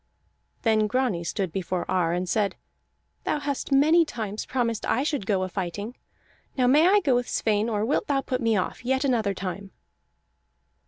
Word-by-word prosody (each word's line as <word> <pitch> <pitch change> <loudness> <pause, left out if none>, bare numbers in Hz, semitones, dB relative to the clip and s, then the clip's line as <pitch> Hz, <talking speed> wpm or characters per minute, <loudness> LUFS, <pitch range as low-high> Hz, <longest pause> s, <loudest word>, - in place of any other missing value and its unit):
Then 220 -2 +3
Grani 245 -7 0
stood 185 0 -2
before 185 0 -2
Ar, 175 -3 +1
and 180 +1 -1
said: 205 +1 0 0.7
"Thou - - 0
hast 285 -1 -3
many 310 +5 +5
times 220 -8 -5
promised 235 -4 -1
I 260 - +1
should 290 -9 -2
go 195 -3 +1
a - - -1
fighting. 200 +5 -5 0.6
Now 255 - +3
may 295 +7 +5
I 405 +2 +5
go 280 -8 +2
with 245 0 0
Sweyn, 215 +1 +1
or 210 -1 0
wilt 275 - 0
thou 275 -2 +1
put 255 -1 -3
me 225 -2 +2
off 185 - -3
yet 265 +2 0
another 225 -7 +1
time?" 195 +1 -5
225 Hz, 175 wpm, -25 LUFS, 195-265 Hz, 0.7 s, many